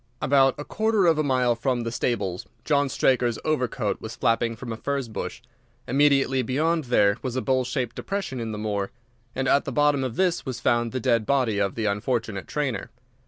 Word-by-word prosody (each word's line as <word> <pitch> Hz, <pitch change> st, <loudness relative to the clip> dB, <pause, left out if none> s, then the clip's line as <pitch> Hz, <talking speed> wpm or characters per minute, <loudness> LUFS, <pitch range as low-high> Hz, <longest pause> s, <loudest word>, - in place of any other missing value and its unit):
"About 135 Hz, -1 st, +4 dB
a 145 Hz, -, -6 dB
quarter 220 Hz, -2 st, +1 dB
of 165 Hz, -2 st, +4 dB
a -, -, +2 dB
mile 130 Hz, -3 st, +2 dB
from 120 Hz, +1 st, -1 dB
the 115 Hz, 0 st, -3 dB
stables 100 Hz, -7 st, -2 dB, 0.2 s
John 145 Hz, -1 st, +2 dB
Straker's 125 Hz, -3 st, +2 dB
overcoat 125 Hz, -7 st, -1 dB
was 110 Hz, +1 st, -7 dB
flapping 115 Hz, +1 st, +1 dB
from 115 Hz, +1 st, -6 dB
a -, -, -4 dB
furze 140 Hz, +2 st, -2 dB
bush. 115 Hz, +1 st, -6 dB, 0.4 s
Immediately 135 Hz, -1 st, +3 dB
beyond 155 Hz, +6 st, 0 dB
there 105 Hz, -4 st, +3 dB
was 130 Hz, -2 st, -4 dB
a 130 Hz, -, 0 dB
bowl 130 Hz, -1 st, +2 dB
shaped 125 Hz, -2 st, -3 dB
depression 195 Hz, -10 st, -3 dB
in 115 Hz, -1 st, -3 dB
the 105 Hz, -, -5 dB
moor, 105 Hz, -2 st, -2 dB, 0.5 s
and 135 Hz, -, -1 dB
at 140 Hz, -, +4 dB
the -, -, -4 dB
bottom 145 Hz, -2 st, +2 dB
of 125 Hz, -3 st, -3 dB
this 180 Hz, 0 st, +1 dB
was 130 Hz, -4 st, -5 dB
found 120 Hz, -1 st, +1 dB
the 130 Hz, -, -2 dB
dead 115 Hz, -3 st, +1 dB
body 125 Hz, -7 st, +2 dB
of 100 Hz, -1 st, 0 dB
the 110 Hz, -, -2 dB
unfortunate 105 Hz, -1 st, -1 dB
trainer. 135 Hz, -9 st, -2 dB
125 Hz, 200 wpm, -25 LUFS, 115-140 Hz, 0.5 s, About